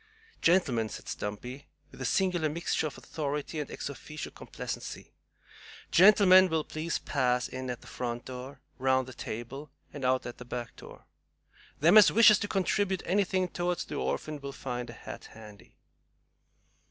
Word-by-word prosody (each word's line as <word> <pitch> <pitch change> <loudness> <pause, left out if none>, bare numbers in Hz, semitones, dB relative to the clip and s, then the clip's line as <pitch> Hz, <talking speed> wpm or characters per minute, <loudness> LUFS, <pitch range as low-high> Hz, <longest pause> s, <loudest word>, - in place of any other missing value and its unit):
"Gentlemen," 140 - +3
said - - -9
Stumpy, 125 +7 -6 0.2
with - - -12
a - - -2
singular 180 -5 +1
mixture 160 0 -1
of 145 - -9
authority 150 +1 -4
and 150 - -4
EX - - -5
OFFICIO 150 +2 -7
complacency, - - -7 0.8
"gentlemen 185 -1 +7
will 160 -1 0
please 155 +2 -3
pass 125 -3 0
in 130 0 -6
at 120 -1 -5
the - - -16
front 120 -1 -4
door, 130 +1 -8 0.2
round 130 0 +2
the 130 - -9
table, 120 +6 -6 0.2
and 145 - -7
out 130 0 +2
at 120 - -7
the - - -7
back 120 -1 -6
door. - - -13 0.8
Them 175 +8 +8
as 210 - +7
wishes 215 -2 +7
to 205 - -2
contribute 195 -1 0
anything 185 -1 +1
toward 175 0 -1
the - - -6
orphan 150 0 -3
will 140 0 -5
find 125 -2 -5
a - - -8
hat - - -9
handy." 105 -3 -14
145 Hz, 160 wpm, -30 LUFS, 125-175 Hz, 0.8 s, Them